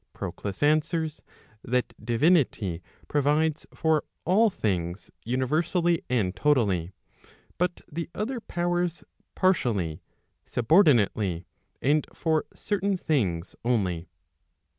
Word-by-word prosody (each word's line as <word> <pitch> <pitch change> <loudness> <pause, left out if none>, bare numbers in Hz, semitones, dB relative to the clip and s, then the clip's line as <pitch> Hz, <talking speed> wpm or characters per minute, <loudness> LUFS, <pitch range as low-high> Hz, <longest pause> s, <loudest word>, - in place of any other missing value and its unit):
Proclus 100 +5 -5
answers, 155 +1 +1 0.4
that 125 +1 0
divinity 120 - +2 0.3
provides 150 +2 +1
for 160 -2 +1 0.2
all 215 +6 +4
things 90 - -2
universally 160 - +1
and 105 -7 +1
totally, 100 - +2 0.7
but 180 0 0
the 165 +1 -5
other 240 +4 -2
powers 175 -3 -1 0.3
partially, 110 - +1 0.5
sub¬ 120 - -3 0.4
ordinate^, 90 -5 -4 0.4
and 150 +3 +2
for 160 -2 +1
certain 200 -1 -1
things 100 - -1
only. 95 -8 0
145 Hz, 95 wpm, -27 LUFS, 105-170 Hz, 0.7 s, all